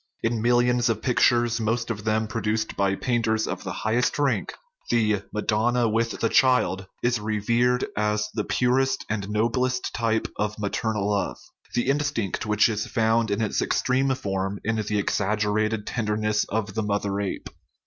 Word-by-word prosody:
In 115 -1 0
millions 120 +1 +3
of 110 -1 -1
pictures, 120 -1 +3
most 115 +2 -1
of 105 -1 -6
them 110 0 +1
produced 110 -1 -2
by 100 -1 +1
painters 110 -1 0
of - - -4
the - - -4
highest 120 +3 +1
rank, 145 -2 0 0.3
the 110 -4 +2
" - - -37
madonna 115 +3 +1
with 115 +1 -1
the 115 - +3
child" 110 -7 +3 0.2
is 120 -1 +2
revered 115 +4 +1
as 105 0 0
the 105 - -1
purest 130 +3 +1
and 100 -2 -2
noblest 125 +4 0
type 115 0 0
of 105 0 -2
maternal 105 0 -1
love 100 -1 -1 0.4
the 120 +1 +1
instinct 135 -9 -1
which 105 0 +4
is 110 -2 -2
found 115 -1 +1
in 100 +2 0
its 105 - 0
extreme 130 +1 +1
form 95 -4 -3
in 110 +1 0
the 105 -1 -1
exaggerated 105 +1 0
ten 115 -3 -3
derness 105 0 0
of 105 -2 -2
the 110 - -1
mother 100 -1 -1
ape. 100 - -4
110 Hz, 165 wpm, -25 LUFS, 105-120 Hz, 0.4 s, which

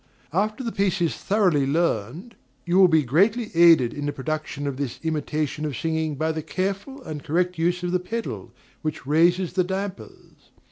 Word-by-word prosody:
After 215 +7 0
the 230 - -2
piece 195 -2 0
is 170 -2 +1
thoroughly 180 -9 +1
learned, 160 - -1 0.3
you 175 +2 +3
will 190 - +8
be 160 -3 +3
greatly 205 - +2
aided 165 -8 +6
in 145 0 -4
the - - 0
production 150 +1 -4
of 140 -2 -3
this 140 -4 -4
imitation 155 -1 -2
of 145 -5 -3
singing 160 -2 -1
by 160 +3 0
the 160 0 -3
careful 195 - -4
and 150 -7 -6
correct 175 +2 0
use 175 +2 0
of 175 - -1
the 180 - +2
pedal 225 +6 -5 0.3
which 155 -4 -4
raises 175 +5 +3
the 185 0 +2
dampers. 190 +1 -7
170 Hz, 180 wpm, -24 LUFS, 150-190 Hz, 0.3 s, will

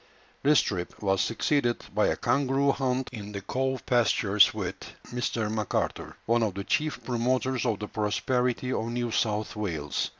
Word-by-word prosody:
This 145 0 +5
trip 90 -3 -4
was 95 -1 +2
succeeded 120 +1 0
by - - +3
a - - +1
kangaroo 140 0 +2
hunt 130 -1 -1
in 105 -2 -7
the 100 - -4
cow 130 +5 -1
pastures 105 -4 +4
with - - -3 0.4
Mr. 120 -2 -1
Macarthur, 110 -2 -2
one 115 +1 +2
of 105 -4 0
the 100 - -3
chief 155 +8 -1
promoters 125 +1 0
of 110 -3 +1
the 105 - -5
prosperity 125 +4 0
of 110 - -1
New 120 0 -2
South 110 -1 0
Wales. 80 -9 -2
120 Hz, 160 wpm, -28 LUFS, 105-130 Hz, 0.4 s, This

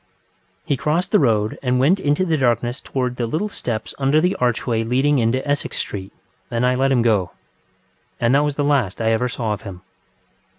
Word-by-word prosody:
ŌĆØ - - -42
He 140 - 0
crossed 160 +7 -1
the 210 - +5
road 110 -5 +1
and 125 -1 +1
went 165 +9 +3
into 145 +2 +1
the 165 -3 +1
darkness 120 -1 0
towards 125 -2 -3
the 120 - -1
little 165 - -2
steps 110 - -4
under 140 +3 +3
the 180 +4 +1
archway 120 -2 0
leading 135 +5 +2
into 125 +4 0
Essex 145 0 -1
Street, 95 -1 -5 0.4
and 120 0 0
I 125 - +3
let 135 +2 +1
him 125 -3 +3
go. 105 -6 +1 0.9
And 120 +1 +2
that 140 +1 +4
was 145 -1 -1
the 145 - 0
last 135 -10 +1
I 115 0 +1
ever 120 +3 +1
saw 115 -3 -2
of 105 - -7
him. 95 -3 -9
125 Hz, 205 wpm, -21 LUFS, 115-145 Hz, 0.9 s, the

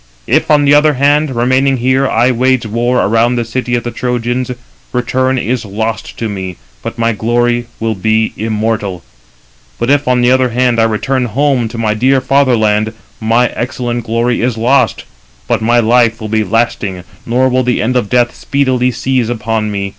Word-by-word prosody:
If, - - +1
on 145 -1 +4
the 140 - +5
one 150 0 +4
hand, 145 +1 +2
remaining 130 +3 +2
here, 130 +2 +1
I 120 +3 +2
wage 130 0 +1
war 120 +3 0
around 115 +3 +2
the 120 -1 -1
city 120 +1 -2
of 120 - -2
the 120 - -4
Trojans, 125 +1 -2 0.4
return 130 +1 0
is 120 +1 -1
lost 110 +2 -4
to 115 - -2
me, 95 -4 -5 0.2
but - - -6
my 115 0 +1
glory 120 +2 0
will 115 0 -1
be 110 +2 0
immortal; 110 -4 -2 0.7
but 120 - 0
if, 145 0 +2
on 125 -1 +2
the 120 +1 +3
other 130 -1 +3
hand, 125 0 +1
I 115 - +4
return 125 +4 -1
home 130 +1 0
to 115 - -8
my 110 -2 0
dear 130 +5 +2
fatherland, 115 -5 +1 0.3
my 115 +2 +2
excellent 120 -1 -3
glory 115 +2 0
is 120 -1 -1
lost, 125 +5 +1 0.4
but - - 0
my 120 +2 +3
life 115 0 +3
will 110 -2 -6
be 110 0 +1
lasting, 105 -3 -1 0.2
nor 125 +3 +1
will 130 0 +1
the 125 -1 0
end 125 +4 0
of 120 -5 0
death 120 -1 +2
speedily 130 -3 0
seize 125 -1 -1
upon 110 -2 -2
me. 100 -1 -3
120 Hz, 185 wpm, -13 LUFS, 110-130 Hz, 0.7 s, the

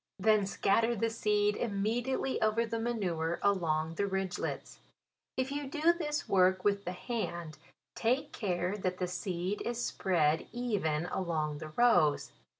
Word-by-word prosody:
Then 210 0 +3
scatter 225 +4 +2
the 230 +1 0
seed 210 -2 +1
immediately 235 +5 -1
over 220 +2 +2
the 230 0 -3
ma 230 +1 -1
nure 170 -6 -1
along 165 -5 +1
the 200 +4 -1
ridglets. 190 -1 -3 0.6
If 260 +1 0
you 285 0 -3
do 320 +4 +3
this 300 -3 -3
work 185 -1 +3
with 200 -1 +1
the 180 - -2
hand, 175 - -4 0.3
take 250 +5 0
care 185 -2 -1
that 185 -1 -1
the 180 - -1
seed 180 +2 -3
is 240 0 -2
spread 160 -4 +1
even 200 -10 -1
along 155 -5 -2
the 155 - -7
rows. 175 -6 +3
200 Hz, 150 wpm, -32 LUFS, 175-230 Hz, 0.6 s, Then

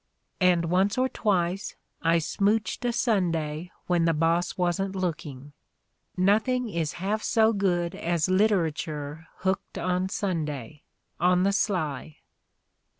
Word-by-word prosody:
And 180 -3 +3
once 190 +6 +1
or 255 +1 +3
twice 190 -5 -1 0.3
I 165 +1 +3
smouched 205 +9 0
a 240 - +2
Sunday 175 -8 0 0.2
when 175 -2 +2
the 165 -1 +2
boss 165 +3 +1
wasn't 185 +2 0
look 180 -5 -2
ing. 140 +1 -10 0.6
Nothing 220 +6 +2
is 165 -6 -2
half 200 +4 -2
so 225 -1 +3
good 175 -4 0
as 170 -3 0
literature 165 -6 0
hooked 190 0 -2
on 180 +1 0
Sunday, 150 - -3 0.4
on 180 +1 +3
the 200 - +3
sly." 160 - -1
180 Hz, 125 wpm, -27 LUFS, 165-200 Hz, 0.6 s, And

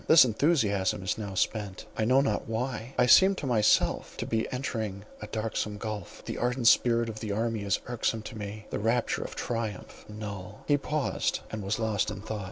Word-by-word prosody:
This 160 -4 +9
enthusiasm 110 - +1
is 95 - 0
now 100 -3 -5
spent, 100 -1 -1
I 110 - 0
know 130 +4 +5
not 110 -7 -1
why; 125 +2 -3
I - - +5
seem 190 +10 +7
to 150 - -5
myself 110 -5 +2
to - - -3
be 110 -1 -1
entering 110 -6 -3 0.2
a 105 - -6
darksome 110 -1 -2
gulph; 105 -3 -6
the - - -4
ardent 125 0 +1
spirit 115 -1 +3
of 110 -1 -6
the 110 -2 -4
army 110 +1 -1
is 100 -1 0
irksome 115 -2 -1
to 120 - -8
me, 105 0 -6
the - - -2
rapture 115 +3 +1
of - - -8
triumph 115 -4 -4
null." 105 -1 -7
He 145 - +5
paused, 150 0 -1
and 110 - -4
was 100 +2 -1
lost 110 -3 0
in 105 -2 -6
thought. 110 -1 -4
110 Hz, 195 wpm, -29 LUFS, 105-120 Hz, 0.2 s, This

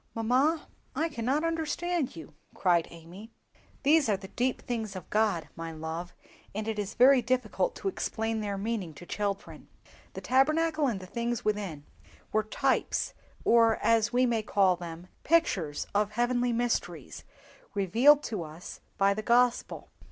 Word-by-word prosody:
"Mamma, 260 +8 +2 0.3
I 320 +4 0
cannot 270 +3 -1
understand 330 - -1
you!" 160 -2 -10 0.2
cried 175 -3 +2
Amy. 170 +6 -12 0.5
"These 295 -2 +4
are 205 - +2
the 190 0 -11
deep 250 +4 -1
things 220 -5 -4
of 185 - -8
God, 210 -7 +1
my 165 0 -6
love, 160 +2 -6 0.4
and 215 +1 -3
it 220 -1 -2
is 205 0 -4
very 255 +1 +6
difficult 255 - 0
to - - -5
explain 225 - -2
their 200 -1 -3
meaning 200 -6 -3
to 175 - -11
children. 200 +1 -4 0.5
The - - -7
Tabernacle 310 +3 +2
and 220 -6 -1
the 185 - -9
things 235 +4 -3
within 200 -9 -2 0.2
it - - -25 0.2
were 215 - +2
types, 215 - 0 0.3
or 230 -1 +5
as 225 0 +2
we 250 +1 +3
may 235 -3 +1
call 195 -3 +3
them, 170 0 -8 0.2
pictures 195 - +1
of 205 +1 +1
heavenly 245 +1 +1
mysteries, 230 - -2 0.5
revealed 240 +10 +5
to 210 -5 -3
us 160 +3 -9 0.2
by 200 0 +4
the 215 - -4
Gospel. 240 +2 +1
220 Hz, 155 wpm, -29 LUFS, 190-255 Hz, 0.5 s, very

